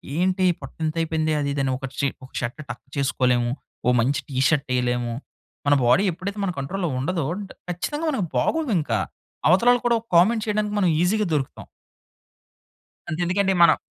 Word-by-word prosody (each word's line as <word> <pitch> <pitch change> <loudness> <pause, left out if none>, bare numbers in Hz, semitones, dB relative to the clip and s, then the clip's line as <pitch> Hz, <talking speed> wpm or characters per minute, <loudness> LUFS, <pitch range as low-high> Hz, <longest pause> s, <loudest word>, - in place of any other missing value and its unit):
ఏంటీ 185 +2 +2 0.2
పొట్టింతయిపోయిందే 155 +2 -1
అది 140 - -1
ఇదని. 135 -2 0
ఒకట్‌షీ 135 +1 -2 0.2
ఒక 130 - -18
షర్ట్ 120 +6 -4
టక్ 120 - -7
చేసుకోలేము. 125 -3 +1 0.3
ఓ - - +4
మంచి 135 +5 +1
టీ 130 - -5
షర్టెయలేము. 125 -4 0 0.5
మన 145 - +6
బాడీ 125 +12 +5
ఎప్పుడైతే 200 +4 -5
మన 180 - 0
కంట్రోల్‌లో 175 +5 -2
ఉండదో 165 +3 -1 0.2
డ్ - - -13 0.2
ఖచ్చితంగా 295 - -3
మనకు 230 -10 -1
బాగోదింక. 220 - 0 0.6
అవతలోళ్ళు 240 +8 +5
కూడా 235 -1 +4
ఒక - - -32
కామెంట్ 220 +5 +4
చెయడానికి 210 -1 -1
మనం 185 -4 +3
ఈజీగా 210 +4 +2
దొరుకుతాం. 135 -3 -3 1.4
అంతెందుకండి 180 +4 +1
మనం - - +6
165 Hz, 140 wpm, -23 LUFS, 135-195 Hz, 1.4 s, మన